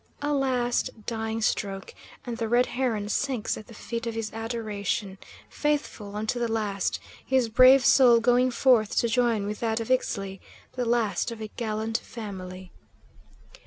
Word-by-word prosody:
A 295 0 0
last, 255 -3 +1 0.2
dying 225 -1 -3
stroke, 195 -3 -2 0.3
and 240 -2 -4
the 225 -1 -2
Red 245 +2 +4
Heron 240 -5 -1
sinks 245 0 -1
at 215 - -10
the 230 - -13
feet 235 +2 -5
of 230 - -3
his 225 -2 -4
adoration, 215 -3 -3 0.3
faithful 285 -9 -2
unto 220 +3 -2
the 235 -1 -1
last, 205 -3 -1 0.2
his 260 -3 +1
brave 255 +2 +7
soul 245 -3 +7
going 245 +2 +3
forth 235 -3 +3
to 235 - +3
join 230 -3 +1
with 210 +1 -4
that 225 -1 0
of 225 +2 -4
Ixtli; 195 -6 -1 0.3
the 250 -1 -2
last 230 -5 +1
of 230 - -7
a 215 -1 -6
gallant 220 0 -2
family. 185 -4 -8
225 Hz, 160 wpm, -26 LUFS, 210-245 Hz, 0.3 s, brave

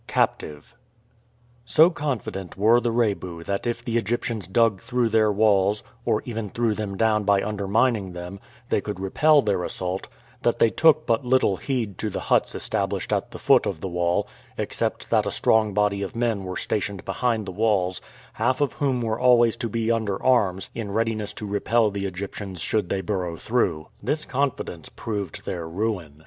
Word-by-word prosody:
CAPTIVE. 75 +10 -1 0.9
So 160 +8 +5
confident 120 - -4
were 110 +4 +5
the 120 - -1
Rebu 100 -7 -1
that 100 +6 -2
if 120 0 -3
the 115 -1 +1
Egyptians 115 -2 -2
dug 105 -1 +2
through 120 0 0
their 110 -1 +3
walls, 105 -1 +3 0.2
or - - +1
even 115 -3 -4
threw 115 +1 0
them 100 -2 -4
down 110 -1 +2
by 100 -1 +3
undermining 105 0 0
them, 90 +2 -7 0.3
they - - +2
could - - -5
repel 145 +10 +4
their 100 -4 0
assault, 90 +1 -3 0.3
that - - +1
they 115 - +4
took 155 -1 +4
but 115 +3 +1
little 125 -6 +2
heed 115 0 -3
to 110 - -1
the - - -4
huts - - +3
established - - -2
at - - -1
the - - -9
foot - - +4
of 90 - -3
the 95 - -4
wall, 85 -1 0 0.3
except - - -3
that - - +3
a - - +1
strong 110 -1 +2
body 100 0 +1
of 100 - -5
men 115 -5 0
were 90 0 -4
stationed 100 -2 -2
behind 115 -4 0
the 95 - -5
walls, 95 -3 +1 0.3
half 130 0 0
of 145 -2 +1
whom 135 -4 0
were 110 -1 -1
always 120 -2 +5
to 120 -2 -3
be 115 +1 0
under 110 -4 -1
arms 100 -8 +2
in 105 -3 -5
readiness 110 -1 -1
to 105 - -7
repel 105 +2 +1
the 100 0 -3
Egyptians 95 0 -6
should 105 +3 0
they 95 - -1
burrow 90 -3 -3
through. 85 -10 0
This 150 +1 -1
confidence 130 - -2
proved 100 -6 -5
their 85 -4 -4
ruin. 90 -6 -3
105 Hz, 180 wpm, -24 LUFS, 95-115 Hz, 0.9 s, So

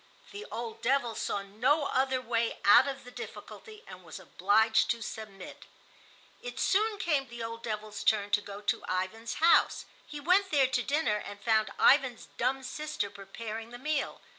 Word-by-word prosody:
The 410 +2 -8
old 230 0 -6
devil 245 -2 +1
saw 200 -2 -2
no 250 +10 +1
other 260 -1 +1
way 235 -2 -1
out 205 - +7
of 275 -1 -5
the 250 - -12
difficulty 430 - -10
and - - -12
was - - -9
obliged 220 +2 +2
to 235 -1 -1
submit. 200 -3 -9 0.8
It 245 +1 -7
soon 420 +5 +2
came 300 -8 0
the 235 0 -7
old 230 0 -6
devil's 215 -2 -5
turn 205 -2 +2
to 210 - +3
go 200 0 -9
to 205 - -1
Ivan's 190 +5 -3
house. 330 +2 +4 0.2
He 295 - -7
went 370 +6 +3
there 285 -5 +4
to 255 -1 0
dinner 280 -5 0
and 205 -1 -8
found 220 +1 +2
Ivan's 260 -4 +4
dumb 265 +2 0
sister 280 -5 -4
preparing 215 +3 -7
the 245 - -9
meal. 295 +2 -2
235 Hz, 170 wpm, -30 LUFS, 215-275 Hz, 0.8 s, out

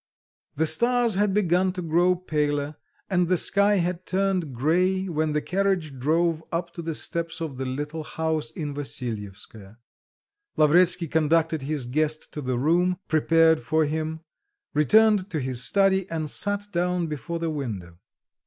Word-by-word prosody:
The 160 - +1
stars 240 +5 +2
had 200 +1 +1
begun 185 -2 +2
to 185 - -5
grow 175 +3 +3
paler 150 -4 -2 0.3
and 180 -2 +1
the 185 +1 +2
sky 200 +4 +3
had 180 -1 -2
turned 190 -5 0
grey 180 +9 +1
when 155 -3 -1
the 150 - -1
carriage 180 -7 -1
drove 165 +4 +1
up 170 0 -3
to 170 - -6
the 165 -1 -4
steps 165 +1 -3
of 155 -6 -5
the 135 - -3
little 150 +4 -4
house 160 -1 -2
in 150 -2 -5
Vassilyevskoe. 110 -7 -6 0.8
Lavretsky 170 +3 +4
conducted 160 0 +1
his 140 -1 -3
guest 155 +4 -2
to 150 - -5
the 130 -2 -2
room 175 +7 +2
prepared 160 +1 +4
for 155 +6 +1
him, 160 +1 -3 0.5
returned 205 +6 +4
to 160 - -2
his 130 -2 -2
study 195 +2 +2
and 155 -3 -3
sat 205 0 -1
down 180 0 0
before 155 +2 -4
the 165 -1 -2
window. 100 - -6
160 Hz, 155 wpm, -25 LUFS, 150-180 Hz, 0.8 s, Lavretsky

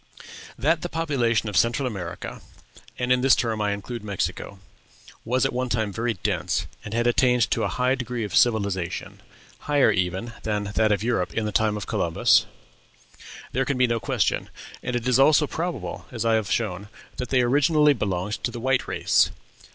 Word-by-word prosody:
That 155 +6 +1
the 175 - -4
population 130 -10 0
of 105 - -4
Central 120 +6 +2
America 95 -8 -6 0.6
(and 125 0 -1
in 125 0 +4
this 135 0 +5
term 110 -2 -1
I 105 - +1
include 105 +3 -5
Mexico) 100 0 -3 0.7
was 130 +4 +1
at 135 - 0
one 125 +1 -2
time 110 -3 -1
very 115 +1 -1
dense, 90 -4 -1 0.2
and 105 - -8
had 120 0 +1
attained 125 -1 +3
to - - +1
a - - +1
high 125 +1 +1
degree 125 -3 -3
of 105 -3 -4
civilization, 100 -7 0 0.4
higher 145 -6 +3
even 95 +4 -2
than 105 -2 -2
that 110 0 +2
of 105 0 +1
Europe 115 -6 -1
in 110 - 0
the 105 - -2
time 105 0 +1
of 105 - -5
Columbus, 85 -1 +2 1.0
there 130 - +1
can 135 0 -2
be 125 - +4
no 115 -1 0
question; 100 - -1 0.3
and 125 - -3
it 120 0 -2
is 125 0 +3
also 150 +2 +5
probable, 140 - -4
as 115 -3 -3
I 115 - +3
have 110 -2 0
shown, 105 -3 -2 0.3
that 125 - -4
they 130 -2 +3
originally 150 +4 +4
belonged 100 -3 -3
to - - 0
the 120 0 -7
white 130 +1 0
race. - - +2
115 Hz, 185 wpm, -24 LUFS, 105-125 Hz, 1.0 s, this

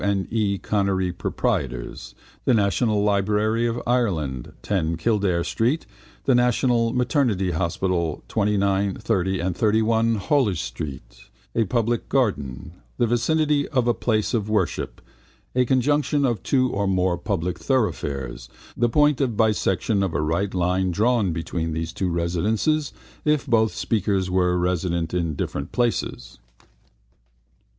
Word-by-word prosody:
and 100 -1 0
E. 105 -3 +1
Connery, 95 -2 0
proprietors), - - -3 0.3
the 125 - +4
National 105 +1 +2
Library 105 +3 +1
of 115 +1 -2
Ireland, 80 - -1
10 85 -5 0
Kildare 100 -3 +1
street, 125 - 0 0.4
the 135 - +4
National 120 -1 +2
Maternity 125 - +1
Hospital, 85 -1 -1
29, 100 -2 +1
30 95 -4 0
and 90 0 -1
31 110 +2 +2
Holles 105 - +1
street, 65 -1 -7 0.2
a 115 - +2
public 120 +1 -1
garden, 75 - -1 0.3
the - - +3
vicinity 145 +5 +1
of 130 -5 0
a 120 - +4
place 110 -3 0
of 110 -3 -1
worship, 105 -6 -1 0.5
a 125 0 +3
conjunction 145 +3 +2
of 120 -6 0
two 130 -2 +1
or 100 0 -1
more 95 -1 +1
public 90 -1 -2
thoroughfares, 70 - -2 0.3
the 120 0 +2
point 150 +3 +3
of 120 -6 0
bisection 105 -2 +1
of 95 -5 -1
a 75 - +1
right 85 +6 -1
line 90 +1 +1
drawn 105 +1 +2
between 80 0 -3
their 80 +3 -2
residences 100 - 0 0.3
(if 150 -2 +1
both 110 -4 +3
speakers 95 -4 0
were 90 -1 +2
resident 90 -2 -1
in 85 -4 -1
different 70 0 -4
places). 115 - -2
100 Hz, 130 wpm, -23 LUFS, 90-120 Hz, 0.5 s, the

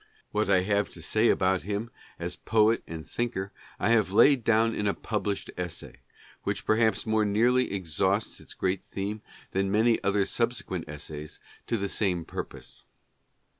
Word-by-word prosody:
What 105 -1 0
I 95 -2 +5
have 100 +2 +1
to 85 - -10
say 110 +7 +3
about 95 -1 +2
him 105 +4 -3 0.3
as - - -4
poet 110 +1 +3
and 80 -1 -7
thinker, 100 -5 -2 0.3
I - - +1
have 110 -4 +4
laid 125 +6 +5
down 115 0 +3
in 105 - -1
a 100 - +1
published 105 -2 -2
essay, 90 -2 -5 0.4
which - - -2
perhaps 110 0 +2
more 110 -1 +2
nearly 120 +5 +3
exhausts 95 +3 0
its - - -10
great 95 0 -1
theme 100 +2 -4 0.3
than 95 0 0
many 110 +3 +3
other 100 0 +2
subsequent 115 -9 -2
essays 75 0 -7 0.3
to 115 - 0
the 100 -1 -1
same 90 -5 0
purpose. - - -7
100 Hz, 160 wpm, -28 LUFS, 95-110 Hz, 0.4 s, I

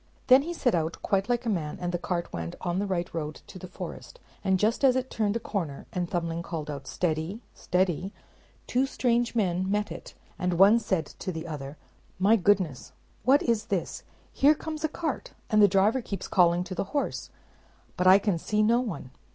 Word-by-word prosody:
Then 255 +1 +7
he 330 +4 -4
set 260 -8 +1
out 165 -1 0
quite 195 +2 0
like 245 0 0
a - - 0
man, 160 -7 -2
and 175 -1 -2
the 175 - -2
cart 175 0 -3
went 85 0 -4
on 175 +1 -1
the 205 - -1
right 175 -2 -1
road 155 -2 -3
to 185 - -11
the 185 - -8
forest; - - -8 0.2
and 190 -2 +3
just 220 +7 +1
as 260 -2 +6
it 260 0 -2
turned 215 -1 0
a - - 0
corner, 170 -12 -4
and 180 -2 -2
Thumbling 170 -1 -2
called 160 -3 -5
out 140 -2 -7
"Steady, 175 +6 -2
steady," 180 +1 0 0.5
two 260 +2 +1
strange 240 -2 0
men 185 -3 +1
met 210 +1 0
it; - - -9 0.2
and 180 -1 0
one 200 +5 +7
said 185 -8 -1
to 185 - -6
the 160 -1 -6
other, 145 -2 -6 0.4
"My 200 +4 +5
goodness, 185 - +1 0.3
what 275 +4 +5
is 230 -3 +1
this? 190 -4 -2 0.3
Here 295 +3 +5
comes 310 0 -6
a 315 - +1
cart, 310 -3 -4 0.2
and 215 -1 +5
the 205 - +8
driver 200 +6 +3
keeps 200 -4 -5
calling 175 -1 +3
to 185 +1 -7
the 185 - -2
horse; 285 - -2 0.7
but 180 - +1
I 190 +1 +9
can 200 -4 0
see 210 +5 +1
no 230 +3 +4
one." 200 - -5
190 Hz, 205 wpm, -27 LUFS, 170-230 Hz, 0.7 s, I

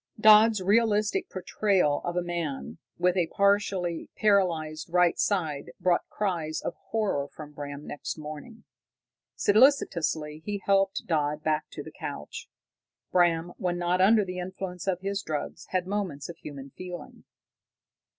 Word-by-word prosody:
Dodd's 215 0 +7
realistic 215 - +2
portrayal 185 -4 +1
of 175 - -3
a 180 - 0
man 160 - -4 0.2
with 180 0 +2
a 175 -3 +2
partly 200 -3 +1
paralyzed 170 -7 +1
right 180 -1 +4
side 160 -8 0
brought 180 -1 +1
cries 170 -6 -2
of - - -4 0.2
horror 200 -11 0
from 150 0 -11
Bram 145 0 -7
next 145 - -5
morning. 155 +10 -9 0.7
Solicitously 170 - +3
he 205 +3 -3
helped 195 0 +2
Dodd 150 -2 0
back 155 -1 0
to - - -7
the - - -10
couch. 75 +1 -7 0.6
Bram, 175 -1 +2
when 175 -1 -1
not 175 +1 +1
under 210 +2 +5
the 180 -1 -5
influence 180 0 -6
of 185 -2 0
his 195 0 -2
drug, 155 -6 -3
had 185 -1 -1
moments 185 -8 -3
of 170 - -8
human 140 -3 -9
feeling. 180 -1 -9
180 Hz, 140 wpm, -28 LUFS, 155-200 Hz, 0.7 s, Dodd's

